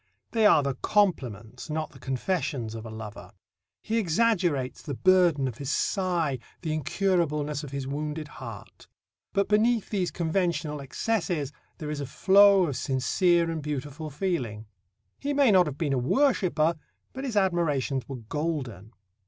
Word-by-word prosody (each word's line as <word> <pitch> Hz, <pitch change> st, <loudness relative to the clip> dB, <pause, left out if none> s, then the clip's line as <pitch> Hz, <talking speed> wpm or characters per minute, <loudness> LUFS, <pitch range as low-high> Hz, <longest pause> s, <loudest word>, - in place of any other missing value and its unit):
They 220 Hz, -2 st, +4 dB
are 155 Hz, -7 st, +5 dB
the 140 Hz, -1 st, 0 dB
compliments, 125 Hz, -, -1 dB
not 155 Hz, 0 st, -3 dB
the -, -, -15 dB
confessions, 135 Hz, -4 st, -2 dB
of 115 Hz, 0 st, -7 dB
a -, -, -7 dB
lover. 110 Hz, -1 st, -9 dB, 0.5 s
He 225 Hz, +1 st, 0 dB
exaggerates 175 Hz, -, +1 dB
the 145 Hz, -4 st, -5 dB
burden 175 Hz, -5 st, +4 dB
of 120 Hz, -3 st, -6 dB
his 140 Hz, -2 st, -4 dB
sigh, 170 Hz, -4 st, 0 dB, 0.2 s
the 160 Hz, -, -2 dB
incurableness 150 Hz, -2 st, 0 dB
of 145 Hz, -, -6 dB
his 140 Hz, 0 st, -4 dB
wounded 150 Hz, +2 st, -4 dB
heart. 115 Hz, -7 st, -10 dB, 0.4 s
But 200 Hz, 0 st, +1 dB
beneath 220 Hz, +1 st, +2 dB
these 190 Hz, -4 st, 0 dB
conventional 165 Hz, -3 st, -1 dB
excesses 165 Hz, -1 st, -1 dB, 0.3 s
there 150 Hz, -2 st, -5 dB
is 145 Hz, -1 st, -3 dB
a 140 Hz, -, -4 dB
flow 195 Hz, +5 st, +6 dB
of 145 Hz, -6 st, -3 dB
sincere 170 Hz, +6 st, +2 dB
and 160 Hz, -1 st, -3 dB
beautiful 150 Hz, +1 st, -5 dB
feeling. 135 Hz, -, -2 dB, 0.5 s
He 285 Hz, 0 st, -2 dB
may 275 Hz, -5 st, +5 dB
not 185 Hz, -4 st, +5 dB
have 140 Hz, -2 st, -5 dB
been 145 Hz, -3 st, 0 dB
a 130 Hz, -, +1 dB
worshipper, 170 Hz, -, +2 dB, 0.4 s
but 265 Hz, -, -6 dB
his 245 Hz, -6 st, -2 dB
admirations 150 Hz, -9 st, +1 dB
were 135 Hz, -, -4 dB
golden. 130 Hz, -, -3 dB
155 Hz, 155 wpm, -27 LUFS, 135-185 Hz, 0.5 s, flow